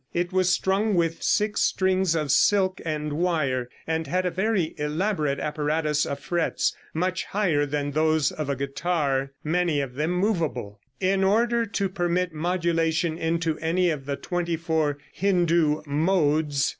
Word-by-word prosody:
It 175 +1 -1
was 185 -1 +3
strung 195 +3 +1
with 165 -1 0
six 210 +1 +1
strings 190 -2 +2
of 150 -4 0
silk 190 +3 +3
and 150 -2 -3
wire, 145 -7 0 0.2
and 160 0 -2
had 185 +1 0
a 180 - 0
very 190 -2 0
elaborate 150 -1 0
apparatus 150 0 0
of 140 - -4
frets, 170 +3 -1 0.2
much 185 +3 -1
higher 170 -8 +1
than 145 0 -2
those 155 -1 +2
of 155 -2 -4
a 140 - 0
guitar, 140 0 -1
many 165 -1 +1
of 135 -3 -3
them 150 +5 -1
movable, 165 - -1 0.2
in 195 +1 +1
order 230 +4 +2
to 200 -1 -1
permit 180 -1 -1
modulation 165 -1 0
into 165 -1 -1
any 170 +2 +1
of 140 -3 -5
the 140 - -1
twenty 175 +1 -2
four 160 -3 0 0.2
Hindoo 170 -5 +2
"modes." 150 -2 +1
165 Hz, 150 wpm, -25 LUFS, 150-185 Hz, 0.2 s, was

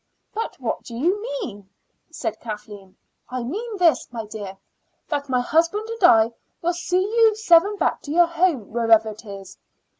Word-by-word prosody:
"But 450 +2 -4
what - - -2
do 235 - -10
you 355 - 0
mean?" 390 - -6 0.4
said 225 -9 -4
Kathleen. 210 -3 -9 0.3
"I 255 -1 -3
mean 420 - -4
this, 340 -8 +2
my 230 -2 -5
dear, 205 -2 -8 0.5
that 285 -2 -2
my 250 -1 +2
husband 335 - +1
and 460 -3 -6
I 225 -9 +6 0.3
will 345 +1 0
see 360 +2 0
you 445 +1 +3
seven 405 -1 +4
back - - 0
to 285 - -7
your 345 +2 +5
home, 335 - 0
wherever 225 -1 +4
it 215 +2 -10
is." 195 -2 -10
295 Hz, 170 wpm, -23 LUFS, -, 0.5 s, I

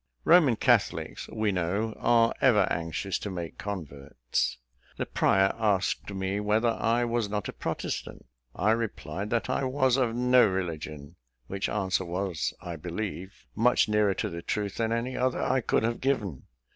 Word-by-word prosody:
Roman 155 -9 +6
Catholics, - - +1
we 110 -2 0
know, 100 +5 -1
are 115 -1 +4
ever 110 -7 +5
anxious 85 +4 -2
to 105 - -5
make 85 -3 -6
converts. 70 -12 -3 0.4
The - - -2
prior 95 0 +2
asked 100 -2 0
me 95 +1 -2
whether 105 +3 +2
I 115 +1 +1
was 120 -3 -1
not 105 -1 -2
a - - -6
protestant? - - -4 0.3
I 110 - +2
replied, 105 -4 -3
that 120 0 0
I - - 0
was 130 -1 +2
of 120 -4 +1
no 125 -1 +5
religion; 80 -4 -4 0.3
which 100 +8 -3
answer 95 -2 0
was, 90 -1 -2
I 85 -2 -6
believe, 95 +3 -6
much 120 +3 +3
nearer 105 -2 +2
to 105 - -2
the 85 0 -5
truth 100 +2 -3
than 115 -1 0
any 120 +3 -1
other 130 0 0
I 130 0 +1
could 110 - +1
have 115 +1 -1
given. 105 - -1
105 Hz, 160 wpm, -28 LUFS, 90-115 Hz, 0.4 s, Roman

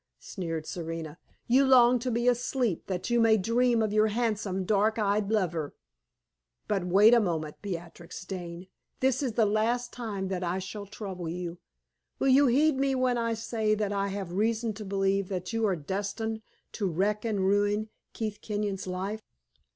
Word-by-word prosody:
sneered 165 -4 -5
Serena. 165 -2 -6 0.3
"You 260 +3 +4
long 250 -2 +6
to 250 +2 -2
be 235 +1 0
asleep 245 -5 0
that 185 +4 -3
you 240 - +3
may 225 -1 +5
dream 230 +3 +2
of 210 -1 -1
your 215 0 +4
handsome, 210 -4 -1
dark 215 +3 +2
eyed 205 -1 +1
lover! 170 -8 -1 0.9
But 195 -4 0
wait 200 +6 +6
a 240 - +7
moment, 160 -7 -2
Beatrix 175 -2 -7
Dane. 175 -2 -6 0.3
This 260 0 +2
is 255 -5 -1
the 220 0 +3
last 230 +4 0
time 205 -6 -4
that 185 -1 -2
I 175 +1 -1
shall 200 +2 -6
trouble 190 -4 -6
you. 175 0 -5 0.6
Will 270 - +1
you 275 +2 +6
heed 285 +4 +3
me 270 0 +1
when 255 -2 +1
I 230 -1 0
say 220 -1 0
that 205 -1 -1
I 200 0 0
have 195 -3 -4
reason 220 +3 0
to 210 +1 -8
believe 195 0 0
that 185 +2 -4
you 225 -1 +1
are 190 - +1
destined 205 +7 -3 0.3
to 200 -4 -2
wreck 205 +5 0
and 220 -3 -1
ruin 205 +2 +1 0.2
Keith 215 -2 -4
Kenyon's 205 -3 -3
life? 190 +4 -3
210 Hz, 175 wpm, -28 LUFS, 185-230 Hz, 0.9 s, a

